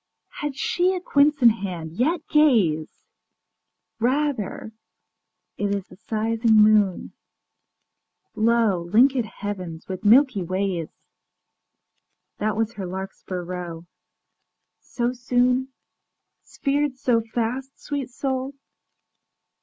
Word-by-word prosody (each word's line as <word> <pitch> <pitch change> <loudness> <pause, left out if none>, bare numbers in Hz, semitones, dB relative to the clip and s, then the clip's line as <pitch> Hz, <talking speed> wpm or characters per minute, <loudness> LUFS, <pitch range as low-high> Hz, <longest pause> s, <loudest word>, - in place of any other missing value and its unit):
Had 295 -2 -3
she 360 +6 +1
a - - -2
quince 295 -4 +2
in 235 - +10
hand? 180 -7 -5
Yet 300 - -1
gaze: 215 - +2 0.9
Rather 250 -4 -1 0.9
it 200 0 0
is 195 -2 -6
the - - -13
sizing 225 +2 0
moon. 210 -3 +4 1.2
Lo, 215 -6 +1
link├©d 250 +2 +4
heavens 185 -6 -7
with 185 -1 -6
milky 240 0 +5
ways! 185 -2 -2 1.5
That 215 0 -1
was 225 0 -1
her 195 -4 -6
larkspur 185 -1 -6
row. 175 -2 -6 1.0
ŌĆöSo 240 +1 -2
soon? 250 +2 +1 0.7
Sphered 280 -1 -2
so 245 -4 +2
fast, 240 +4 -4
sweet 285 -4 -4
soul? 265 +1 -3
225 Hz, 100 wpm, -23 LUFS, 195-265 Hz, 1.5 s, in